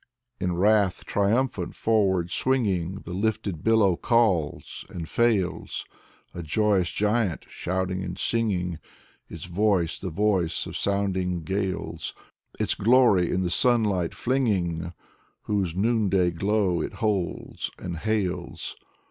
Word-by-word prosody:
In 90 -2 -1
wrath 100 0 +2
triumphant 105 -2 0
forward 95 -6 +1
swinging, 100 -9 0
The 85 - -8
lifted 100 -4 -2
billow 110 -5 +4
calls, 95 -9 +1
and 85 -2 -6
fails, 105 -6 0 0.5
A 85 - -5
joyous 95 +2 +1
giant, 105 -4 0
shouting, 95 0 -3
singing. 90 -9 -1 0.5
Its 85 0 -8
voice 90 -2 +1
the 95 - -4
voice 95 -2 0
of - - -7
sounding 95 -3 0
gales. 95 -2 -3 0.4
Its - - +1
glory 115 -6 +4
in 95 - 0
the 90 - -1
sunlight 105 -7 +2
flinging 95 -10 0 0.5
Whose 95 -5 -1
noonday 100 -4 +2
glow 95 0 +1
it - - -4
holds 105 -5 -2
and 90 -2 -5
hails. 95 -3 -2
95 Hz, 115 wpm, -26 LUFS, 90-105 Hz, 0.5 s, billow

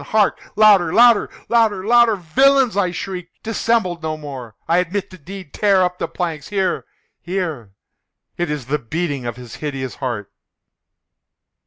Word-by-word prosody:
—hark! 215 -2 +1 0.2
louder! 205 -6 +5
louder! 235 0 +5 0.2
louder! 220 -5 +2
louder! 235 -1 +5
"Villains!" 255 +8 +3
I 200 -3 +2
shrieked, 180 -1 -7
"dissemble 225 -5 0
no 155 -1 -3
more! 135 -7 -8
I 170 +2 +3
admit 190 +3 -2
the 185 - -11
deed!—tear 190 +3 0
up 180 0 -2
the - - -1
planks!—here, 180 +3 -2 0.4
here!—It 165 - -6
is 150 -4 -3
the 150 +4 -1
beating 140 0 -3
of 120 - -4
his 125 -2 -10
hideous 135 -4 -5
heart!" 120 -7 -4
180 Hz, 135 wpm, -20 LUFS, 145-205 Hz, 0.4 s, louder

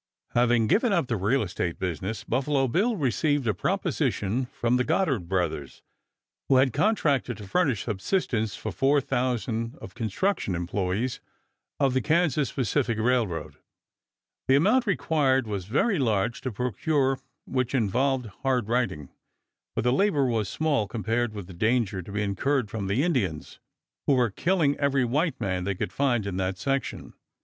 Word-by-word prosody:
Having 120 -1 +3
given 225 - +2
up 175 -7 +2
the 120 - -1
real 110 +6 +1
estate 90 -3 -3
business 95 +4 -3
Buffalo 135 +2 +1
Bill 210 - +1
received 145 - +1
a 110 - +2
proposition 105 +5 -1
from 120 0 0
the 125 - +2
Goddard 140 - 0
Brothers, 85 -7 -2 0.7
who 135 - +5
had 130 -2 +4
contracted 145 - +1
to 105 -3 -9
furnish 135 - +1
subsistence 110 - -1
for 135 +8 +1
thousands 120 -2 -1
of - - -11
construction 115 - -1
employes 95 +7 -2 0.6
of 135 -3 +2
the 130 - +2
Kansas 155 -3 +1
Pacific 125 -2 0
Railroad. 110 -9 0 0.9
The 130 - +5
amount 235 - +3
required 140 -7 +2
was 100 -4 -4
very 155 - +1
large 115 -2 0
to 130 - -3
procure 130 - 0 0.3
which 130 0 -1
involved 130 +3 +1 0.2
hard 130 -5 +1
riding; 115 - -1 0.7
but - - 0
the 125 +1 +3
labor 165 -4 +2
was 110 -5 0
small 145 -8 0
compared 115 +2 -1
with 100 -3 -6
the 95 - -11
danger 110 0 +1
to 95 - -10
be 105 +1 -1
incurred 110 +4 0
from 105 -3 -3
the 105 +9 +1
Indians, 105 - -1 0.5
who 140 - +5
were 120 -4 +2
killing 165 - +1
every 140 -2 +2
white 150 +7 0
man 95 -4 -1
they 100 +1 -1
could 90 - -4
find 125 -6 +1
in 95 -2 -3
that 95 0 -1
section. 135 +9 -3
125 Hz, 155 wpm, -26 LUFS, 105-140 Hz, 0.9 s, who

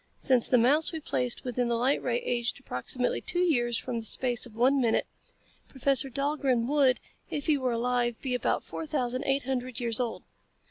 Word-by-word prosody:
Since 255 -4 +2
the 250 - +5
mouse 280 +7 +3
we 325 - -4
placed 250 -5 -2
within 245 -1 -1
the 235 - +1
light 255 +4 +1
ray 240 -1 0
aged 240 +1 -1
approximately 250 - -3
two 350 - -2
years 240 -9 +1
in 245 -2 -2
the - - -5
space 245 +2 -1
of 220 - -17
one 260 +4 +3
minute, 230 -2 +2 0.6
Professor 270 0 +3
Dahlgren 275 -3 0
would, 270 -1 +3 0.3
if 290 - -3
he 310 - +4
were 260 -3 -1
alive, 240 0 0
be 260 -2 -3
about 250 - 0
four 320 - -6
thousand, 255 -3 -1
eight 275 0 +1
hundred 255 -1 -3
years 235 -2 -1
old." 240 -2 -3
250 Hz, 190 wpm, -28 LUFS, 240-275 Hz, 0.6 s, the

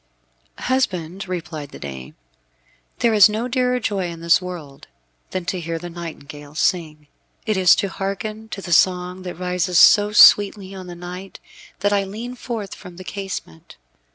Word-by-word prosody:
"Husband," 190 -8 -1
replied 165 -5 -5
the - - -11
dame, 65 -2 -8 0.8
"there 235 -1 +2
is 210 -1 +8
no 220 +3 -2
dearer 250 0 +1
joy 200 -5 -1
in 170 -1 -8
this 170 +2 +4
world, 165 -7 -8 0.4
than 185 -2 -4
to 185 0 -2
hear 165 -1 -4
the 175 +1 -8
nightingale 150 -3 -9
sing. 155 -3 -1 0.4
It 215 - 0
is 185 -3 +6
to 200 - -1
hearken 205 +3 -5
to 195 - -7
the 175 - -1
song 180 +1 +2
that 180 -1 -6
rises 180 0 -1
so 205 +3 +7
sweetly 200 -2 +6
on 185 -1 -9
the 175 - -8
night, 180 +2 -9 0.4
that 205 +1 +2
I 200 -1 +2
lean 220 +6 -6
forth 230 -5 -5
from 180 -2 -12
the 185 - -8
casement. 185 - -7
185 Hz, 165 wpm, -21 LUFS, 170-205 Hz, 0.8 s, is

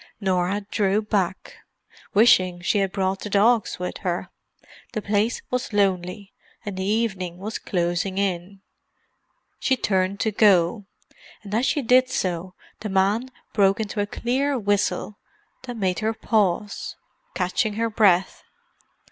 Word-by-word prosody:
Norah 190 0 0
drew 200 -1 +2
back, 190 -3 -2 0.6
wishing 185 -5 +5
she 175 +4 +1
had 195 -1 0
brought 190 -1 -1
the 210 - -6
dogs 215 +3 +3
with 180 0 -5
her; 175 -1 -3 0.6
the 215 - -2
place 210 +3 0
was 250 -3 -2
lonely, 195 0 0 0.3
and 205 -2 -4
the 190 - -3
evening 195 -4 -1
was 210 +4 -5
closing 175 +1 -1
in. 190 0 -2 1.0
She 260 - +1
turned 190 -2 0
to 220 - +1
go; 200 -1 +3 0.6
and 205 -1 -8
as 235 +4 +2
she 290 - 0
did 255 +2 +4
so 180 0 -2 0.2
the 215 - -5
man 200 +6 +1 0.2
broke 195 -1 +3
into 210 -1 -2
a 205 - -1
clear 265 +6 -1
whistle 205 -1 -1 0.5
that 245 -2 -6
made 185 -4 0
her 220 0 -1
pause, 210 -2 0 0.4
catching 215 -4 0
her 230 +1 -1
breath. 195 -4 +3
200 Hz, 140 wpm, -24 LUFS, 185-220 Hz, 1.0 s, wishing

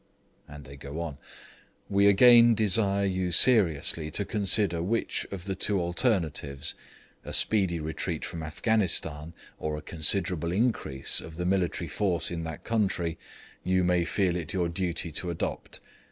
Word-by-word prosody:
And 75 -1 -12
they 70 +1 -12
go 70 +3 -8
on: 80 -5 -6 0.7
'We 100 0 +2
again 120 +3 +6
desire 100 -1 +1
you 95 -2 -2
seriously 85 - +4
to 100 +6 -2
consider 100 -5 +1
which 110 +7 -2
of 95 -2 -8
the 100 - -3
two 95 +1 0
alternatives 85 - -1 0.5
(a - - -8
speedy 95 -6 +2
retreat 80 0 -4
from 85 - -6
Afghanistan, 80 -3 0 0.3
or 75 -1 -4
a 75 - -9
considerable 85 0 +1
increase 95 - +1
of 80 - -11
the 90 +1 -4
military 90 -2 -1
force 90 +1 -1
in 85 -1 -4
that 80 -1 -8
country) 95 -7 -2 0.4
you 95 0 +1
may 90 -1 +1
feel 90 0 -1
it 85 +1 -5
your 90 -3 -1
duty 85 -1 -3
to 85 +4 -3
adopt. 85 - -5
90 Hz, 150 wpm, -27 LUFS, 80-100 Hz, 0.7 s, again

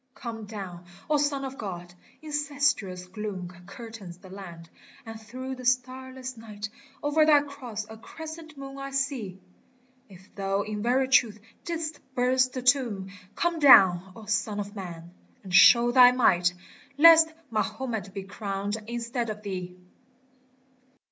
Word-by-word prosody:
Come 225 -3 -7
down, 190 -5 -8 0.3
O 300 - +4
Son 285 -1 0
of 265 0 -7
God 175 -4 -6
I 180 - -24
incestuous 280 -11 -1
gloom 190 -2 -6 0.2
Curtains 205 -4 -10
the 185 0 -15
land, 175 -4 -10 0.4
and 225 0 -9
through 255 +4 -7
the 255 -1 -9
starless 255 +1 -2
night 215 -2 -7 0.4
Over 295 +2 +3
thy 300 -2 +6
Cross 250 -7 -7
a 220 - -11
Crescent 315 +5 -10
moon 275 0 -8
I 275 0 -5
see! 265 -9 -3 0.7
If 190 +1 -17
thou 195 0 -1
in 210 0 -5
very 255 +4 +2
truth 235 -5 +3 0.3
didst 325 -2 -4 0.2
burst 255 +1 +2
the 255 - -5
tomb 240 -8 +1 0.2
Come 345 -1 0
down, 190 - +7
O 220 - -11
Son 210 0 -1
of 205 +1 -6
Man! 170 -3 -8 0.3
and 190 -2 -9
show 235 +5 +7
thy 250 0 +8
might, 180 -8 +3 0.4
Lest 325 +1 +8 0.2
Mahomet 220 -2 -3
be 195 0 -6
crowned 200 +1 -4
instead 235 0 -3
of 210 0 -6
thee 180 -3 -5
225 Hz, 145 wpm, -27 LUFS, 195-265 Hz, 0.7 s, thy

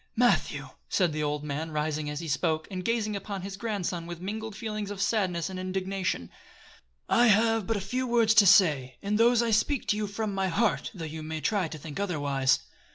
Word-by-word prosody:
"Matthew," 245 +1 +2 0.2
said 175 -5 +2
the 155 - -2
old 150 0 -1
man, 150 +2 -3
rising 150 -1 -2
as 150 +1 -4
he 165 - -6
spoke, 155 +2 0
and 185 -1 -4
gazing 220 -2 0
upon 200 -1 -5
his 195 0 -5
grandson 195 -5 -3
with 175 -1 -7
mingled 215 +3 -5
feelings 215 -1 -4
of 205 -1 -6
sadness 185 -6 0
and 190 -1 -6
indignation, 185 - -2 0.8
"I 240 +1 +4
have 225 -1 +3
but 225 - 0
a - - -3
few 255 +7 -2
words 230 -2 +4
to 215 -2 +7
say, 140 -10 +4
and 210 +2 0
those 235 0 +5
I 230 - 0
speak 245 +5 +1
to 210 - +2
you 210 -1 -1
from 205 +1 -3
my 195 0 0
heart 205 +5 +1
though 165 -3 -5
you 160 0 -6
may 155 0 -4
try 195 +1 0
to 155 - -7
think 150 +1 -7
otherwise. 145 -8 +1
190 Hz, 210 wpm, -28 LUFS, 160-215 Hz, 0.8 s, to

